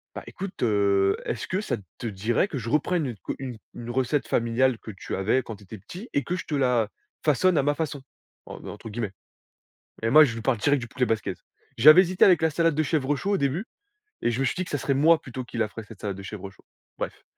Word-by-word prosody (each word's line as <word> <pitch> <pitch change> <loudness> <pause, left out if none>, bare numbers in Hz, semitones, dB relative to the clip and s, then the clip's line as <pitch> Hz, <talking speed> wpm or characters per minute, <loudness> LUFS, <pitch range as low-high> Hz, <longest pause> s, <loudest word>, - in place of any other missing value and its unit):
«Bah - - -6
écoute, 195 0 -7
heu, 100 -3 +3
est-ce 120 - -3
que 185 - -1
ça - - -1 0.2
te - - -6
dirait 110 - 0
que 150 - -5
je 115 -1 -4
reprenne 155 +3 +1
une 125 -4 -4
q - - -5
une 130 -3 -6 0.2
une 120 0 -7
recette 130 +3 0
familiale 120 +2 +2
que 110 - -8
tu 95 - -6
avais 105 +7 +2
quand 115 - -7
tu 105 - -17
étais 110 +4 -9
petit 185 - -10
et 140 - +1
que 180 - -2
je - - -5
te - - -5
la 125 -6 +2 0.3
façonne 160 +4 +3
à - - +2
«ma 145 +1 +2
façon»?» 150 -2 -3 0.5
Heu, - - -7
en - - -10
entre 110 +2 -8
guillemets, 110 -2 -3 0.9
et 115 - +1
moi 155 +5 +9
je 125 - -3
lui 115 - -5
parle 120 +1 +1
direct 145 +5 +2
du 120 - -6
poulet 125 +2 0
basquaise. 105 -5 -2 0.4
J'avais 155 +9 +9
hésité 185 0 +2
avec 180 -4 +5
la 160 - +3
salade 165 0 +1
de 155 - +2
chèvre 145 -2 0
chaud, 175 +9 -2
au 200 - +3
début 140 +8 -1 0.6
et 120 - +2
je 120 - -2
me 135 - +2
suis - - 0
dit 185 - -1
que - - -10
ça 145 - -1
serait 140 +2 0
moi 160 +4 +5
plutôt 130 0 -6
qui 120 - -9
la 110 - +2
ferais, 110 +2 -9
cette 105 -1 -14
salade 100 -2 -3
de 100 - -8
chèvre 100 0 -7
chaud. 95 - -22 0.3
Bref, - - -5
130 Hz, 260 wpm, -26 LUFS, 110-155 Hz, 0.9 s, moi